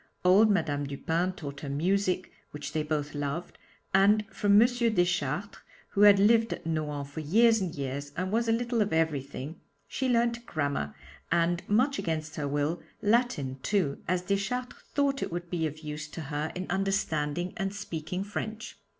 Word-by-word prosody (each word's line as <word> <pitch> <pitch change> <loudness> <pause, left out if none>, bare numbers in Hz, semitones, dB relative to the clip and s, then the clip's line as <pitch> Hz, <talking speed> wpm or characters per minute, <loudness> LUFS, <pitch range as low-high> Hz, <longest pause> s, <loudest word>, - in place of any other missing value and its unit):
Old 200 +5 +6
Madame 155 -7 +1
Dupin 165 +6 -1
taught 140 -6 -7
her 145 - -6
music, 185 +5 0 0.2
which 150 -1 -7
they 155 - +1
both 150 -1 -2
loved, 145 +4 -4 0.3
and 205 +2 +5
from 205 -1 +4
M. 235 - +7
Deschartres 195 - 0 0.3
who 200 - 0
had 205 -1 +9
lived 225 +3 +4
at - - -5
Nohant 150 -3 -2
for 145 +3 -7
years 220 +8 +4
and 180 -3 -3
years 140 0 -4
and 185 +2 -1
was 230 +2 +1
a - - +3
little 235 0 +1
of 205 -3 0
everything 150 -1 -2 0.3
she 260 -1 -1
learnt 235 0 +2
grammar, 140 - -2 0.4
and, 170 +1 +2
much 255 +7 +3
against 155 -1 -3
her 145 -2 -1
will, 145 +4 -1 0.2
Latin 205 - +1
too, 185 -10 0
as 180 +1 0
Deschartres 210 +7 -2
thought 280 -1 +2
it - - -2
would 175 0 -5
be 165 -3 0
of 155 +1 -8
use 150 -1 -5
to 165 - -7
her 150 +1 -3
in 185 +1 -3
understanding 175 -4 0
and 195 -2 -2
speaking 180 -2 -4
French. 220 +2 -5
175 Hz, 170 wpm, -29 LUFS, 150-205 Hz, 0.4 s, had